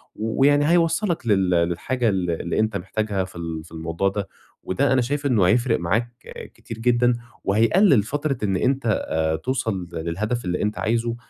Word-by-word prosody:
و 110 +4 -3
ويعني 145 +2 +4
هيوصّلك 170 - +1
لل 95 -4 +3
للحاجة 90 +8 +1
ال 95 -3 -1
اللي 85 +3 -2
أنت 110 -1 +1
محتاجها 100 +1 -2
في 95 - -15
ال 80 -2 -5
في 85 - -17
الموضوع 85 +4 -1
ده. 100 0 -4 0.4
وده 135 +9 +1
أنا 130 - +3
شايف 145 +4 -2
إنه 115 -9 +3
هيفرِق 120 +1 +2
معاك 115 +8 0 0.4
كتير 115 - -9
جدًا، 120 +1 +3 0.3
وهيقلِّل 115 - +4
فترة 145 +3 -2
إن 95 -2 +1
أنت 135 +3 0 0.2
آآ، 80 0 0
توصل 100 - -2
للهدف 95 +8 -3
اللي 90 0 -1
أنت 105 0 -1
عايزه، 115 +1 0
110 Hz, 170 wpm, -23 LUFS, 90-130 Hz, 0.4 s, ويعني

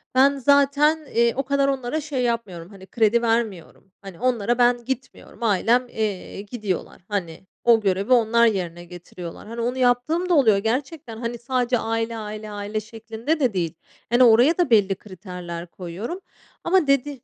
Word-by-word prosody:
ben 275 +2 +5
zaten, 285 +3 +3
eee, 235 -2 +2
o 275 - -1
kadar 280 +1 +1
onlara 270 +2 -2
şey 285 -4 -3
yapmıyorum, 200 -8 -3
hani, 195 -2 -13
kredi 230 +1 +2
vermiyorum. 225 -6 -2
Hani, 195 -4 -11
onlara 240 -2 +1
ben 245 -1 +3
gitmiyorum 260 -1 -6
ailem, 230 +4 +2
eee, 210 -4 -4
gidiyorlar, 205 -5 -5
hani, 190 -4 -4 0.2
o 230 -2 +5
görevi 195 +3 -1
onlar 235 -1 +4
yerine 175 -5 -1
getiriyorlar, 175 +1 -10
hani, 230 +1 -5
onu 245 +2 -2
yaptığım 260 +9 +1
da - - +3
oluyor 225 -9 +5
gerçekten, 245 +3 -3
hani, 235 +1 -4
sadece 245 0 0
aile, 225 +1 -2
aile, 215 0 -7
aile 205 +1 -4
şeklinde 225 +7 -4
de 255 -6 +1
değil. 170 -4 -1 0.4
Hani, 240 +2 +5
oraya 245 +7 +5
da 350 -5 +1
belli 200 -4 +4
kriterler 180 -3 -8
koyuyorum 185 - -7 0.4
ama 355 -3 +2
dedi 275 +1 +2
230 Hz, 160 wpm, -23 LUFS, 200-255 Hz, 0.4 s, ben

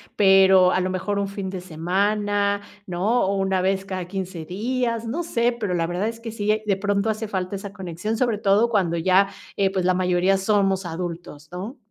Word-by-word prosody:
pero 190 -2 +6
a - - +2
lo 185 0 -1
mejor 190 +2 -2
un 200 - -1
fin 195 -1 -5
de 185 -2 -5
semana, 200 +4 0 0.3
¿no? 195 +7 +1
O 195 +1 0
una 190 -1 +1
vez 190 +1 0
cada 185 -2 -4
15 185 -3 -5
días. 230 +5 -2
No 255 +10 -2
sé, 240 -8 +1
pero 205 -6 -2
la 165 -1 +1
verdad 175 +5 -2
es 230 0 -5
que 230 -1 -6
sí 215 0 0
de 200 -2 +1
pronto 205 +2 0
hace 215 +1 -4
falta 190 -1 -3
esa 200 0 -7
conexión, 190 +3 -4
sobre 230 -3 0
todo 205 +3 +3
cuando 180 -6 +1
ya, 190 +4 +3 0.3
eh, 195 -1 +2
pues, 190 -2 -1
la 185 - +4
mayoría 180 +1 +2
somos 195 -2 +1
adultos, 165 -3 -6
¿no? 195 +9 -6
195 Hz, 200 wpm, -23 LUFS, 185-210 Hz, 0.3 s, pero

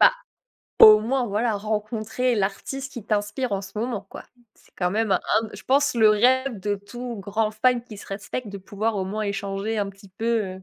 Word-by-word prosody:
Bah, - - +8 0.7
au 215 -1 +10
moins 250 +3 0
voilà, 220 +2 0
rencontrer 215 +4 -1
l'artiste 225 +7 -3
qui 240 -5 -8
t'inspire 215 +3 -1
en 195 - 0
ce 195 +2 -8
moment, 230 -2 -2
quoi. - - -9 0.3
C'est - - -26
quand 180 -1 0
même 215 0 +1
un - - +2 0.3
je 205 - -10
pense 280 +1 +2
le 220 -2 +5
rêve 255 +2 +3
de 205 +1 -1
tout 240 +4 -7
grand 215 +2 -1
fan 240 +3 +2
qui 235 -3 -11
se - - -11
respecte, 210 +4 -5
de 200 - -7
pouvoir 210 +3 -2
au 190 - -1
moins 210 +3 -3
échanger 200 +1 -3
un 200 -1 -1
petit 195 0 -17
peu, 210 +5 -6 0.3
heu, 190 - -14
215 Hz, 205 wpm, -24 LUFS, 200-240 Hz, 0.7 s, au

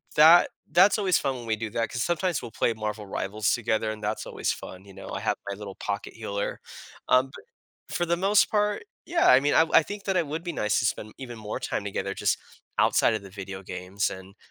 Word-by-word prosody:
that 160 +3 +8 0.2
that's 195 +4 +6
always 190 -3 +3
fun 135 -1 -1
when 120 -2 -8
we 110 - +1
do 110 0 -4
that 115 +1 -1
'cause 125 - -2
sometimes 175 -2 0
we'll 120 - -8
play 115 - +1
Marvel 105 -1 -4
Rivals 105 +2 -1
together, 110 -2 0
and 110 0 -8
that's 105 +1 -2
always - - -1
fun, 95 0 -8
you 100 - -14
know? 95 - -10
I - - -3
have - - 0
my 100 - -3
little 100 -1 -8
pocket 100 0 -4
healer. 100 -2 -4 0.5
Um, 130 +1 +5
bu 135 - -12 0.5
for 175 - +1
the 170 0 +1
most 195 +3 +4
part, 210 - +1 0.2
yeah, 340 -1 +2
I 125 - +8
mean, 145 +1 +1
I - - +7
w 160 - -1
I - - +8
think 205 +4 -7
that 195 -2 +1
it 170 -4 +1
would 160 +3 -4
be 175 - -3
nice 105 - +1
to - - 0
spend 110 -1 -2
even 120 -3 -7
more 105 -1 -5
time - - -2
together 100 -1 -3
just - - +1 0.4
outside - - +4
of 110 - -4
the 100 - -10
video 95 0 -7
games 90 +2 -2
and 95 +1 -10
115 Hz, 240 wpm, -26 LUFS, 100-165 Hz, 0.5 s, that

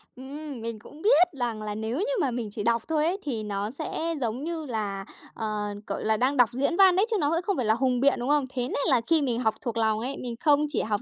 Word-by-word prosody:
Ừm, 275 0 -8
mình 230 -1 -4
cũng 295 +8 -14
biết 410 -4 +6
rằng 230 -3 -2
là 210 -1 -4
nếu 220 +4 -3
như - - 0
mà 270 -4 +1
mình 235 -3 -3
chỉ 210 -1 -4
đọc 235 0 +2
thôi 310 -1 +1
ấy, 360 +4 +1
thì 230 -7 -2
nó 205 +1 -3
sẽ 320 +3 -3
giống 240 +4 -2
như 325 -2 -3
là, 205 -5 -3 0.3
ờ, 215 -2 -3 0.2
gọi - - -3
là, 220 0 +2
đang 265 +4 +1
đọc 245 -2 +5
diễn 280 +6 0
văn 380 -2 +7
đấy 390 - +4
chứ 435 - +2
nó 290 -3 +1
cũng 330 - +1
không 390 +2 -1
phải 250 - 0
là 215 - +4
hùng 250 0 +1
biện, 280 +1 +5
đúng 245 +3 -2
không? 290 -3 +3
Thế 250 -2 -1
nên - - -3
là 250 -4 +4
khi 325 -2 +5
mình 245 -4 0
học 220 -3 +1
thuộc 235 -2 -3
lòng 220 -1 +2
ấy, 260 +4 -4
mình 240 -2 -5
không 295 0 +5
chỉ 295 - -1
học 210 -2 -1
250 Hz, 280 wpm, -26 LUFS, 220-300 Hz, 0.3 s, văn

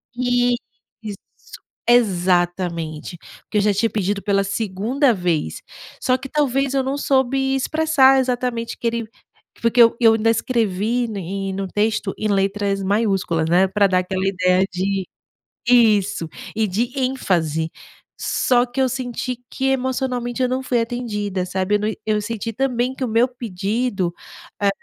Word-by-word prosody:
Isso! 245 -1 +2 1.3
Exatamente 175 -6 +1 0.3
que 210 - -1
eu - - +4
já 205 0 +3
tinha 225 +3 +1
pedido 200 -1 -1
pela 200 -1 +2
segunda 220 +6 0
vez. 170 - -1 0.4
Só 255 0 +2
que 270 0 -9
talvez 275 -2 +1
eu 270 -1 +1
não 270 +2 -2
soube 270 0 +1
expressar 270 -2 +4
exatamente 245 -2 -2
que 235 - -2
ele 230 -1 -2 0.5
foi 230 -1 +1
que 245 - +5
eu 230 0 +6
eu 225 -2 +6
ainda 225 +1 +2
escrevi 230 0 0
em 195 +1 -4
no 195 0 -3
texto, 210 0 0
em 215 - -1
letras 195 0 0
maiúsculas, 190 -6 0
né, 185 +2 +4
pra 200 +1 +3
dar 185 -1 +2
aquela 185 +1 -2
ideia 185 0 +2
de 190 +1 -2 0.6
Isso! 210 -8 +3 0.3
E 220 -1 +2
de 235 +7 -1
ênfase. 170 - 0 0.5
Só 245 -1 +2
que 245 +2 -4
eu 260 - +3
senti 250 -1 -4
que 265 - -2
emocionalmente 260 -2 -1
eu 250 - +2
não 260 +1 -1
fui 245 -2 +1
atendida, 210 -6 -2
sabe? 190 +2 -1
Eu - - -2
na 210 - 0 0.2
eu 210 -1 +1
senti 230 +1 -4
também 255 +1 0
que 265 - -3
o 250 - -2
meu 230 +3 +3
pedido, 210 -4 -2 0.5
eh, 200 - +4
220 Hz, 150 wpm, -21 LUFS, 195-250 Hz, 1.3 s, eu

